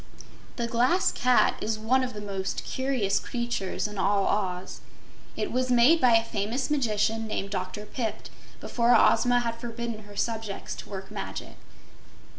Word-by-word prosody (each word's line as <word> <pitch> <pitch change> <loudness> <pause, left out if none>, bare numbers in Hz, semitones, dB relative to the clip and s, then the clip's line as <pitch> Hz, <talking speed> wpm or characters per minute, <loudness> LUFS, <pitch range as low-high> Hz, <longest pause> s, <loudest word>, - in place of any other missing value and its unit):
The 235 - -1
Glass 245 +10 +2
Cat 250 0 +3
is 215 0 -1
one 250 +5 +2
of 250 -3 -4
the 210 - -5
most 195 -2 -3
curious 260 -7 0
creatures 235 -6 -2
in 210 -2 -7
all 200 +1 +2
Oz. 185 -3 -2 0.6
It - - -2
was 255 +1 0
made 250 +7 +5
by 245 -2 +6
a 225 - +4
famous 230 +6 -2
magician 225 -5 +1
named 200 -2 -3
Dr. 200 +2 -4
Pipt 225 0 -4 0.3
before 240 0 +2
Ozma 245 -1 +4
had 230 -1 -3
forbidden 235 -2 -5
her 205 0 -13
subjects 220 -2 -3
to - - -9
work 195 -1 -7
magic. - - -6
225 Hz, 155 wpm, -27 LUFS, 205-245 Hz, 0.6 s, by